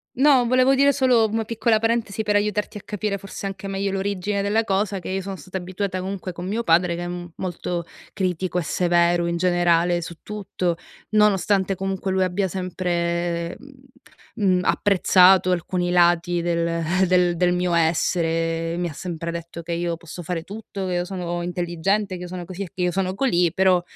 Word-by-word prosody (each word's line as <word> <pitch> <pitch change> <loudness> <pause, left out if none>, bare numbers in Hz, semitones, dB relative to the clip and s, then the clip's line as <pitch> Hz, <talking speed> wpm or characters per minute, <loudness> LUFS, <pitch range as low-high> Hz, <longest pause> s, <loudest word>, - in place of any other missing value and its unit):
No, 265 -2 +5
volevo 255 +2 +4
dire 280 +1 +4
solo, 250 -5 +3
mhmm, 215 - -7
una 225 - 0
piccola 230 0 +1
parentesi 225 -1 0
per 210 -1 0
aiutarti 210 0 0
a - - -15
capire 205 -1 -3
forse 195 +1 -8
anche 195 0 -5
meglio 195 0 -2
l'origine 200 +1 -1
della 210 +3 +1
cosa, 200 -1 0
che 185 - -7
io 190 +1 -1
sono 195 +1 -5
stata 190 0 -7
abituata 185 +1 -3
comunque 185 0 -4
con 175 +1 -6
mio 220 +4 -1
padre, 170 -1 +3
che 175 - -4
è, - - -4
mhmm, 175 -1 -6
molto 175 -2 -4 0.3
critico 185 -1 -1
e 180 - +1
severo 175 +1 +2
in 170 0 -1
generale 175 -1 +2
su 170 0 -7
tutto, 195 -4 -3 0.3
nonostante 200 -2 +2
comunque 195 0 -3
lui 190 0 +2
abbia 185 +2 0
sempre, 175 -2 -2
mhmm 280 -1 -15 0.6
mhmm, 185 -4 +2
apprezzato 185 -1 +5
alcuni 180 0 -1
lati 175 0 +3
del 170 -1 0 0.3
del 180 -1 +3
del 180 +1 +2
mio 180 0 0
essere 165 0 +1
e - - -2
mi 175 0 -1
ha 160 - -7
sempre 170 0 -5
detto 170 0 -7
che 170 - -6
io 170 0 -2
posso 170 +1 -9
fare 170 0 -3
tutto, 200 0 -7
che 180 - -2
io 175 0 0
sono 175 -2 -4
intelligente, 180 +3 -1
che 180 - -8
io - - -6
sono 180 0 -6
così 185 +2 -8
e 185 - -8
che 185 - -5
io 180 - +2
sono 185 +1 -1
colì; 180 -8 +2
però 185 -1 +3
185 Hz, 195 wpm, -23 LUFS, 175-200 Hz, 0.6 s, No